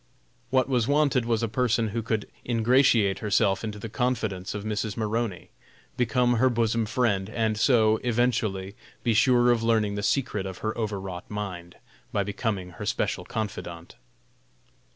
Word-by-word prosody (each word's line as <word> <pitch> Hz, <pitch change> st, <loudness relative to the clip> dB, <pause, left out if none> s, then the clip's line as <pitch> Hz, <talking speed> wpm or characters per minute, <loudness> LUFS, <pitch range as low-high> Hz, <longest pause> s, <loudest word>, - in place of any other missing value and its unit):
What 130 Hz, +1 st, +2 dB
was 125 Hz, -4 st, +1 dB
wanted 140 Hz, -4 st, +2 dB
was 115 Hz, -1 st, 0 dB
a -, -, +1 dB
person 115 Hz, -1 st, +1 dB
who 115 Hz, +3 st, -2 dB
could 110 Hz, -1 st, -2 dB, 0.2 s
ingratiate 115 Hz, -3 st, +3 dB
herself 100 Hz, -2 st, +1 dB
into 105 Hz, -2 st, -4 dB
the 105 Hz, -, -6 dB
confidence 110 Hz, -6 st, -2 dB
of 100 Hz, -, -4 dB
Mrs. 105 Hz, 0 st, -3 dB
Maroney, 110 Hz, -3 st, -2 dB, 0.4 s
become 120 Hz, 0 st, +2 dB
her 130 Hz, +3 st, +4 dB
bosom 115 Hz, -2 st, 0 dB
friend, 105 Hz, -5 st, 0 dB
and 110 Hz, -1 st, 0 dB
so, 110 Hz, -1 st, +4 dB
eventually, 110 Hz, -6 st, 0 dB, 0.3 s
be 120 Hz, -, +2 dB
sure 120 Hz, +2 st, +4 dB
of 120 Hz, -2 st, +2 dB
learning 110 Hz, -3 st, +2 dB
the 100 Hz, -, -3 dB
secret 105 Hz, -4 st, 0 dB
of 95 Hz, -, -7 dB
her 110 Hz, -, -1 dB
overwrought 95 Hz, -5 st, -4 dB
mind, 95 Hz, -5 st, -6 dB, 0.4 s
by 100 Hz, -, +1 dB
becoming 100 Hz, -2 st, -3 dB
her -, -, -7 dB
special -, -, -1 dB
confidante. 85 Hz, -6 st, -5 dB
110 Hz, 150 wpm, -26 LUFS, 100-120 Hz, 0.4 s, her